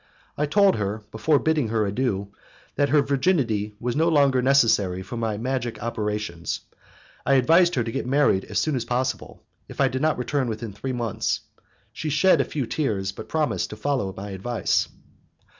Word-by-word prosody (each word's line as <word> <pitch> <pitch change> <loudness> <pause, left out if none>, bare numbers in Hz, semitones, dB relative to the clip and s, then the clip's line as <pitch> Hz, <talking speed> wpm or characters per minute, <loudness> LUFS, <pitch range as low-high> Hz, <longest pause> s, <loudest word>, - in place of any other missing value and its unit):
I 150 - 0
told 200 - +4
her, 105 +1 -3
before 145 +7 +2
bidding 155 -4 +1
her 110 -1 0
adieu, 100 -2 -1 0.5
that, 145 0 +2
her 145 0 +4
virginity 130 - 0
being 120 +1 -2
no 165 +1 +3
longer 140 -5 +4
necessary 110 -9 +3
for 120 - -7
my 110 -3 -2
magic 120 0 -3
operations, 105 -6 -3 0.6
I 135 - +3
advised 165 +7 +4
her 120 - +1
to 115 - -4
get 135 +1 -3
married 135 -8 +2
as - - -4
soon 155 -3 +1
as 125 - -1
possible, 125 +2 -3 0.3
if - - -11
I 135 -1 +4
did 130 +1 -3
not 155 0 +2
return 125 +1 -1
within 110 -1 -5
three 130 +6 -4
months. 120 -4 -2 0.5
She 155 +4 -4
shed 155 +1 +4
a - - -1
few 140 -1 -3
tears, 105 -8 -1
but - - -10
promised 155 -2 0
to - - -7
follow 135 -9 -1
my 100 +1 -6
advice. 100 +2 0
125 Hz, 180 wpm, -24 LUFS, 105-145 Hz, 0.6 s, told